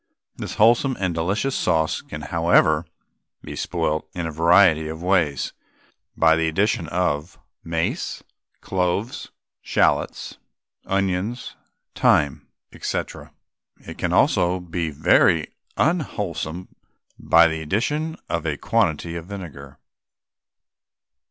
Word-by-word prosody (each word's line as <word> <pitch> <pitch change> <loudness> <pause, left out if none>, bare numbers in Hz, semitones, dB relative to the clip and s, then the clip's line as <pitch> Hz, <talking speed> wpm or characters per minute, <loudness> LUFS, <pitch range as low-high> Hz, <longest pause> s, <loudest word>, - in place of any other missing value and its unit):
This - - -6
wholesome 120 +4 +4
and 90 -3 0
delicious 95 +11 -1
sauce 80 -3 +1
can, 75 - -8
however, 80 0 +2 0.6
be - - -7
spoilt 80 0 -2
in 85 -1 -3
a 80 - -3
variety 85 0 +4
of 80 +2 -7
ways 85 -8 +1 0.6
by 80 0 +5
the 80 0 +1
addition 85 0 0
of 85 -1 -1 0.3
mace, 80 0 -2 0.4
cloves, 95 +4 -2 0.3
shallots, - - 0 0.5
onions, 100 +4 -2 0.4
thyme, 70 -3 +2 0.3
&c. - - -1 0.9
It - - -9
can - - -1
also 90 +1 +3
be 85 -1 -3
made 75 - -7
very 80 +1 +3 0.2
unwholesome 95 - -2 0.5
by 85 0 +5
the 80 -1 -3
addition 145 - -1
of 85 - -2
a 75 -2 -1
quantity 85 -7 0
of 85 0 -6
vinegar. 75 -9 -9
85 Hz, 110 wpm, -23 LUFS, 80-95 Hz, 0.9 s, by